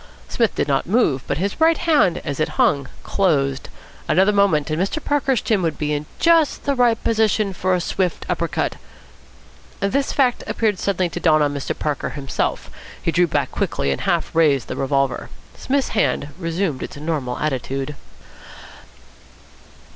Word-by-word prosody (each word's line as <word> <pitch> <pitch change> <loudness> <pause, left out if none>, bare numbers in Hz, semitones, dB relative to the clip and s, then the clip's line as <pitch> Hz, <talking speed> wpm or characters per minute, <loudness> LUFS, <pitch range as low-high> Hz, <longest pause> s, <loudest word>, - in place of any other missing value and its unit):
Psmith 230 -3 0
did - - 0
not 140 +1 0
move, 180 - +2
but - - -1
his 200 - -3
right 325 0 +5
hand, 305 - +3
as 145 -2 -3
it 155 0 -2
hung, 140 -2 +2 0.2
closed. 140 -8 0 0.4
Another 190 +3 +4
moment 180 -7 +2
and 155 +3 0
Mr. 195 +10 -1
Parker's 275 -4 +1
chin 215 -4 +1
would 165 -3 -1
be 150 0 -1
in 150 +1 -3
just 330 -3 +3
the 280 - +1
right 245 -3 +3
position 215 -2 +1
for 185 +1 0
a - - 0
swift 180 0 -2
upper - - -1
cut... - - -2 1.0
This 270 +8 0
fact 255 -4 +1
appeared 210 -4 0
suddenly 185 -3 0
to 175 - -5
dawn 155 -3 +4
on 145 -1 0
Mr. 140 -1 -4
Parker 150 -2 -2
himself. 140 -2 -3 0.3
He 165 - -1
drew 175 +1 +3
back - - -1
quickly, 70 - -1
and 70 - -2
half - - 0
raised 145 -6 +2
the - - -3
revolver. 135 -1 -1 0.3
Psmith's 275 0 -1
hand 205 -9 0
resumed 165 -4 -2
its - - -6
normal 145 -5 -3
attitude. 135 0 -3
170 Hz, 165 wpm, -21 LUFS, 145-215 Hz, 1.0 s, right